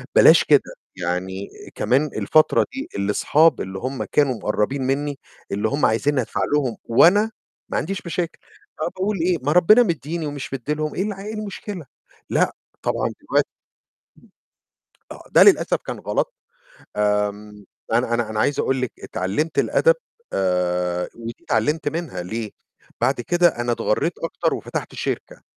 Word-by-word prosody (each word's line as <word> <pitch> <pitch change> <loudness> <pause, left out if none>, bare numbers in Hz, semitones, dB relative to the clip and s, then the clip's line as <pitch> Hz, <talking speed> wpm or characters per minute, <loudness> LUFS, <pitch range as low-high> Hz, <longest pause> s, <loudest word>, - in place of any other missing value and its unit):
بلاش - - +8
كده، - - +3 0.2
يعني 95 +2 -3 0.3
كمان 135 +4 +2
الفترة 155 -1 +4
دي 275 +1 -5
الأصحاب 125 +9 +3
اللي 95 0 -5
هُم 130 +3 -3
كانوا 140 -4 +2
مقربين 105 +5 -1
مني، 140 +1 -1 0.3
اللي 100 +1 0
هُم 145 +2 +1
عايزينني 130 +5 +2
أدفع 115 - -3
لهم 135 -6 +1
وأنا 200 - +5 0.4
ما - - -1
عنديش 190 +4 -3
مشاكل، 170 -1 -3 0.4
آه، - - +1
أقول 195 +4 -2
إيه؟ 175 +1 +2
ما 145 - +1
ربنا 180 +8 +6
مديني 165 - -2
ومش 145 -2 -6
مدي 135 +3 -2
لهم، 155 0 -3
إيه 185 - 0
الع 200 -2 -4
إيه 215 - -5
المشكلة؟ 205 -4 -6 0.4
لأ، - - +1 0.3
طبعًا - - 0
دلوقتي - - +1 1.6
امم، - - -8
آه، - - -14
ده - - +8
للأسف 400 - +5
كان - - -5
غلط، - - -1 0.6
آمم، 105 0 -1 0.3
أنا 120 0 +2
أنا 115 -2 0
أنا 110 -1 -3
عايز 145 +6 +1
أقول 135 -1 +1
لِك 130 - -2
اتعلمت 100 - -2
الأدب، - - +4 0.4
آآ، 90 -1 0
ودي 115 0 -7
اتعلمت 150 +8 +1
منها، 155 - -3
ليه؟ 110 +3 -4 0.5
بعد 130 -2 +2
كده 175 +6 +3
أنا 120 -5 -1
اتغرّيت 120 - 0
أكتر - - -1
وفتحت - - -5
شركة. - - -4
135 Hz, 150 wpm, -22 LUFS, 105-165 Hz, 1.6 s, بلاش